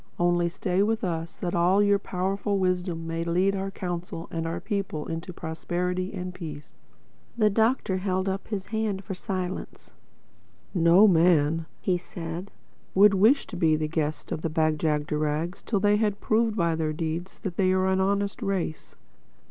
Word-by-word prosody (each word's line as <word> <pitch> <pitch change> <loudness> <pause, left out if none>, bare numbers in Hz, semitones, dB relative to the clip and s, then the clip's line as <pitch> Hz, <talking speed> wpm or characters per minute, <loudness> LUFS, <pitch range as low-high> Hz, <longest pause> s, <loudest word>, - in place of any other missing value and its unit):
Only 175 0 +2
stay 180 +2 0
with 220 +2 +1
us, 165 -2 -3
that 175 - -2
your - - +1
all 200 +3 +4
powerful 195 +2 -1
wisdom 180 -3 -1
may 165 0 -2
lead 180 +4 +2
our 195 0 -2
Council 175 -3 -5
and 165 0 -2
our 165 - -3
people 195 -8 -3
in 165 0 -3
prosperity 180 +2 -3
and 180 -2 -5
peace." 150 -4 -8 0.6
The 215 -2 +4
Doctor 220 -2 +2
held 185 0 -1
up 195 +1 -2
his 200 -3 -3
hand 215 -3 -1
for 195 - -5
silence. 185 0 -5 0.8
"No 175 +3 +6
man," 165 -3 +3 0.3
said 170 +2 -6
he, 190 - -10
"would 205 0 +8
wish 220 +9 +4
to - - -9
be 160 -3 +3
the 155 0 -1
guest 155 -1 -2
of - - -2
the 165 - -1
Bag 155 -1 +1
jagderags 150 +2 -1
till 205 - -1
they 205 +1 +3
had 210 -2 0
proved 225 0 +1
by 170 -2 +2
their 155 -1 -1
deeds 165 +3 -4
that 190 -5 -4
they 185 -2 +3
are 185 0 +2
an 190 0 +2
honest 200 +3 0
race. 195 -6 -3
180 Hz, 170 wpm, -26 LUFS, 165-195 Hz, 0.8 s, would